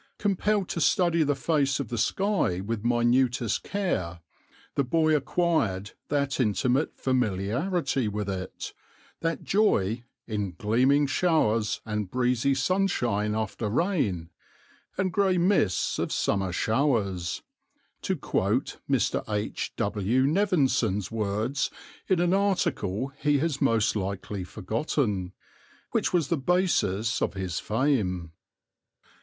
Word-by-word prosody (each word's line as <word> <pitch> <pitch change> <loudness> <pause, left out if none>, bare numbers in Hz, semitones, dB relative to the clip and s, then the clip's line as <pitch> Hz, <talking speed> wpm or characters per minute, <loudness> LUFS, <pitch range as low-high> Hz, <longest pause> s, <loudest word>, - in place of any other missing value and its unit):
Compelled 205 0 +1
to 170 - -2
study 170 +4 +3
the 145 -2 +2
face 140 0 +1
of 135 -6 -4
the 120 - -3
sky 195 - +1
with 105 +2 -3
minutest 120 0 +2
care, 95 - -2 0.5
the 140 - +1
boy 155 +4 +2
acquired 140 - 0 0.2
that 140 -1 0
intimate 125 +5 +1
familiarity 130 - 0
with 105 0 -3
it, 95 -1 -5 0.5
that 165 0 -2
joy 120 - +2 0.2
"in 105 -4 -3
gleaming 130 +8 +3
showers, 130 - +1
and 105 -3 -3
breezy 125 +2 +1
sunshine 125 - +1
after 110 0 -2
rain, 105 - 0 0.7
and 185 -1 0
grey 195 -2 +2
mists 175 - +2
of - - -1
summer 95 -2 0
showers" 105 -5 0 0.6
(to - - -1
quote - - -1
Mr. - - +1
H. 105 0 -2
W. 105 +6 +1
Nevinson's 135 - +1
words 110 +6 -1 0.4
in 190 -3 +2
an 175 +1 +2
article 140 - 0
he 145 -1 +3
has 150 -1 -1
most 115 -6 +2
likely 100 0 -3
forgotten), 105 - -2 0.6
which - - +1
was 170 -6 +1
the 170 - +1
basis 130 - +1
of - - -1
his 95 -4 -3
fame. 105 - 0
125 Hz, 115 wpm, -27 LUFS, 105-160 Hz, 0.7 s, study